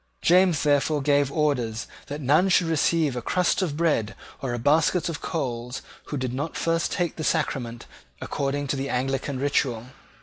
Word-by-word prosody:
James 180 -2 +4
therefore 145 0 +2
gave 145 -1 +2
orders 125 -8 0 0.2
that 145 +1 -5
none 150 +8 +3
should 180 -1 +4
receive 160 -3 +1
a 125 - -3
crust 180 - +1
of 155 -6 -2
bread 150 -10 +1 0.3
or 135 - -2
a 120 - -2
basket 155 +7 +2
of 165 - -5
coals 125 -4 -4 0.2
who 145 - -4
did 130 -2 -3
not 145 +5 -3
first 165 0 0
take 175 -2 -1
the 160 - -4
sacrament 125 -7 -1 0.3
according 140 +1 -2
to 140 - -1
the 135 +1 -3
Anglican 135 +1 -1
ritual. 125 -4 0
145 Hz, 170 wpm, -25 LUFS, 130-160 Hz, 0.3 s, James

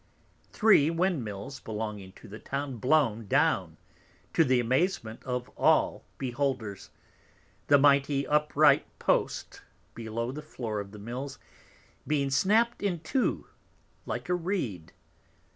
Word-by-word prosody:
Three 210 -9 +5
Windmills 135 - -2
belonging 105 -3 -6
to - - -14
the 105 +2 -9
Town 140 -2 -4
blown 115 -4 +2
down, - - +1 0.6
to 165 - +5
the 130 -4 +3
Amazement 120 - -1
of 125 -1 -3
all - - +2
Beholders; 120 -6 -3 0.8
the 145 - +6
mighty 140 0 +3
upright 150 -1 +3
Post - - -1 0.3
below 115 +1 -4
the 150 +3 -7
Floor 115 -8 -5
of 100 -1 -6
the 105 - -11
Mills 125 +6 -6 0.7
being 140 -2 +1
snapt 220 - +2
in 185 -5 -1
two 250 +11 -1 0.6
like - - -4
a 180 - +1
Reed. 165 - -3
135 Hz, 120 wpm, -28 LUFS, 110-150 Hz, 0.8 s, the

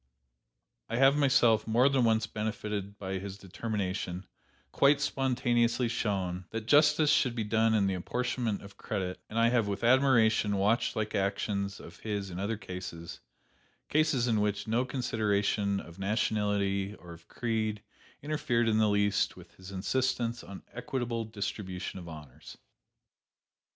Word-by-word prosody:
I - - -2
have 135 +3 +5
myself 125 -7 +4
more 120 +4 +4
than 135 -2 +2
once 110 -1 +3
benefited 105 -2 -4
by 95 -1 -4
his 100 0 -7
determination, 95 -2 -4 0.5
quite 140 +1 +4
spontaneously 120 -3 +1
shown, 95 -6 -2
that 115 -1 -5
justice 150 +3 +5
should 125 -3 +2
be 115 - -1
done 110 +1 +2
in 100 -2 +3
the 95 - +1
apportionment 120 +3 -2
of 100 0 -13
credit; 95 -3 -3
and 110 - -5
I 115 0 +5
have 120 -3 +2
with 100 +3 -3
admiration 115 -5 +4
watched 105 +6 +1
like 110 -1 -2
actions 100 0 -1
of 85 - -12
his 100 -3 -4
in 90 - -6
other 105 +3 -2
cases: 90 -4 -7 0.7
cases 150 -5 +2
in 110 -3 +2
which 100 0 -1
no 115 +4 +1
consideration 105 -5 0
of 85 +2 -11
nationality 100 -1 0
or 85 -4 -12
of 85 0 -16
creed 110 -3 -2 0.4
interfered 130 -6 0
in 110 -1 +3
the 110 -1 +4
least 100 0 +1
with 85 -1 -14
his 95 +1 -12
insistence 120 +4 -1
on 100 - -10
equitable 120 -2 -3
distribution 100 -3 -5
of 85 -2 -9
honors. 75 -2 -11
105 Hz, 145 wpm, -30 LUFS, 100-120 Hz, 0.7 s, have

